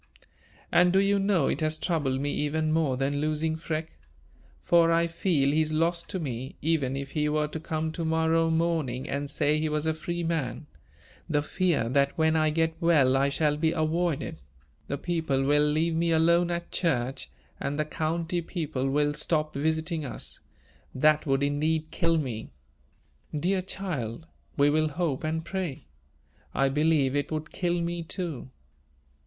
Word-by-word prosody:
"And 180 0 +5
do 190 - +3
you 200 0 +3
know 195 -7 +2
it - - 0
has 155 0 +1
troubled 150 -6 0
me 145 +1 -1
even 155 +1 0
more 155 -5 +1
than 140 +2 0
losing 155 +1 0
Freke; 160 0 -5 0.6
for 170 -1 +4
I 165 0 +3
feel 165 -4 +1
he 155 +2 +3
is 155 0 -1
lost 170 +2 0
to 190 - -3
me, 130 -4 -5
even 145 -4 0
if 140 0 -5
he 150 -1 0
were 150 0 +1
to 160 - -5
come 160 0 -2
to 165 +1 -4
morrow 160 0 +2
morning 160 -6 0
and 140 +1 -3
say 150 +1 +1
he 155 0 0
was 150 0 -1
a 160 - +2
free 170 +2 -4
man; 160 -3 -2 0.6
the 145 -1 +1
fear 170 -7 0
that 140 +2 +1
when 160 0 +3
I 155 -1 +3
get 160 +1 +1
well 150 -7 +4
I 135 +1 +3
shall 150 +1 +1
be 160 +1 +1
avoided; 160 -1 -1 0.5
the 140 - -2
people 160 -5 -1
will 145 +2 +3
leave 155 +3 +1
me 170 +1 +1
alone 170 +2 +4
at 170 0 -3
church, 135 - -1 0.3
and 140 +1 -2
the 150 - 0
county 165 +3 -2
people 155 -6 -3
will 145 +1 +1
stop 150 +1 -1
visiting 160 +2 -1
us. 140 - -5 0.6
That 155 +3 +3
would 135 0 +2
indeed 155 +2 0
kill 165 -2 +1
me." 120 -7 -3 0.9
"Dear 185 +4 +1
child, 165 - -4 0.3
we 145 0 +4
will 155 +1 +2
hope 155 -3 -2
and 160 +1 -2
pray. 185 -8 -4 0.7
I 135 0 +3
believe 145 -1 +2
it 145 +1 -1
would 155 0 -4
kill 175 -1 -1
me 170 0 -2
too." 165 -6 -4
155 Hz, 170 wpm, -27 LUFS, 145-165 Hz, 0.9 s, And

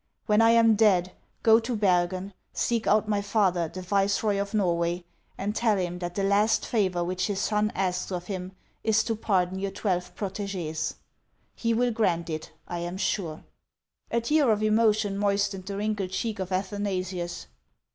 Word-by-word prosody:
When 210 0 +4
I 225 - +6
am 230 -1 +6
dead, 195 -4 +3 0.3
go 225 0 +7
to 235 +1 -3
Bergen, 185 -1 +1 0.2
seek 230 -2 0
out 215 +1 +3
my 205 -1 +1
father, 195 -5 +1
the 185 +3 -8
viceroy 200 +2 +1
of 200 +2 -4
Norway, 175 -3 +1 0.3
and 205 +2 -2
tell 225 -3 +2
him 180 -1 -2
that 175 -1 -5
the 200 - 0
last 210 +2 +3
favor 185 -6 +1
which 185 +2 -1
his 200 -2 -2
son 210 +1 +1
asks 185 -1 -1
of 180 -1 -3
him 185 -2 -5 0.3
is 220 -1 +3
to 225 0 -1
pardon 190 -4 0
your 195 0 -2
twelve 180 -3 -2
proteges. 190 -6 -3 0.6
He 230 -1 0
will 245 +1 +2
grant 175 -7 0
it, 155 0 -5 0.2
I 175 - -4
am 175 +2 -4
sure." 180 -5 -2 0.7
A 235 - +1
tear 285 0 +3
of 215 0 +1
emotion 215 -2 +2
moistened 200 -2 0
the 200 -1 -4
wrinkled 205 -2 -1
cheek 210 +2 -3
of 190 0 -4
Athanasius. 185 -2 -3
200 Hz, 170 wpm, -27 LUFS, 180-215 Hz, 0.7 s, go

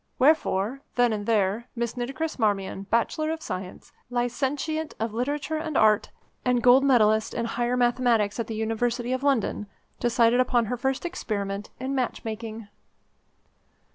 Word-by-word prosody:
Wherefore, 260 -4 +2
then 245 -2 +3
and 205 -1 -4
there, 215 +1 +1
Miss 235 0 -2
Nitocris 270 +5 -3
Marmion, 195 -2 -1
Bachelor 310 +7 +1
of 320 0 -3
Science, 185 0 -6 0.2
Licentiate 270 +6 -2
of 220 -1 -2
Literature 285 +6 -2
and 310 -2 -2
Art, 215 -1 +4 0.3
and 250 -1 +1
Gold 250 +2 +7
Medallist 220 -5 +3
in 235 - -1
Higher 240 +2 -1
Mathematics 240 -4 +2
at 230 - -2
the 225 - -4
University 235 +3 -1
of 260 - -1
London, 265 -6 0 0.3
decided 240 0 +3
upon 245 -2 +3
her 250 - -2
first 265 +5 -1
experiment 205 - -3
in 260 +2 -3
match 255 -3 -2
making. 220 -1 -6
240 Hz, 145 wpm, -26 LUFS, 220-260 Hz, 0.3 s, Gold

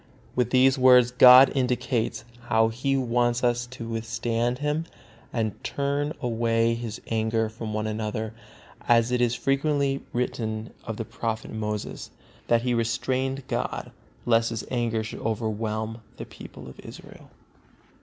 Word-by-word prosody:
With 125 -2 +1
these 130 +1 +4
words 125 -1 +6
God 125 +1 +9
indicates 125 -2 -1 0.2
how 110 -1 +3
He 135 +4 -1
wants 120 -1 +1
us 120 0 +1
to 125 -2 -8
withstand 115 +1 -1
Him 150 +3 -1 0.5
and 110 -4 -3
turn 140 +2 -1
away 115 -1 +1
His 115 -2 -5
anger 110 0 0
from 110 0 -6
one 110 0 -1
another, 110 0 -3 0.5
as 115 0 +4
it 125 0 +1
is 120 -1 +2
frequently 140 0 0
written 110 -2 -3
of 115 -2 -5
the 115 - -4
Prophet 110 0 -4
Moses, 105 -1 -4 0.4
that 115 0 +3
he 125 -1 +1
restrained 130 +3 -1
God, - - -3 0.3
lest 115 -1 +3
His 115 -1 -4
anger 115 -3 0
should 110 - -7
overwhelm 110 0 -2 0.2
the - - -6
people - - -12
of 65 - -12
Israel. - - -12
120 Hz, 140 wpm, -26 LUFS, 110-125 Hz, 0.5 s, God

